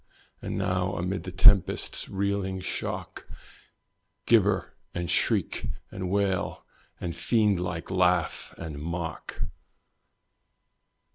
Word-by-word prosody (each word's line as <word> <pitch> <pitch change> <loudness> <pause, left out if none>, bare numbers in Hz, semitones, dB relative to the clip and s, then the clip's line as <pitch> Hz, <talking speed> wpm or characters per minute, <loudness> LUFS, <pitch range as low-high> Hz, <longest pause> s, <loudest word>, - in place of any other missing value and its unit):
And - - -3
now 95 -1 0
amid 90 +3 -2
the 90 - -4
tempest's 95 +1 +4
reeling 100 -1 -1
shock, 95 - -4 1.0
Gibber, - - +3 0.2
and 85 -1 -2
shriek, - - +1 0.2
and 95 -1 -4
wail 100 -1 0 0.3
and 85 -2 -4
fiend 105 +1 +2
like 90 0 -4
laugh 90 -2 +2
and 80 -3 -6
mock. 85 +1 -4
90 Hz, 95 wpm, -28 LUFS, 85-95 Hz, 1.0 s, tempest's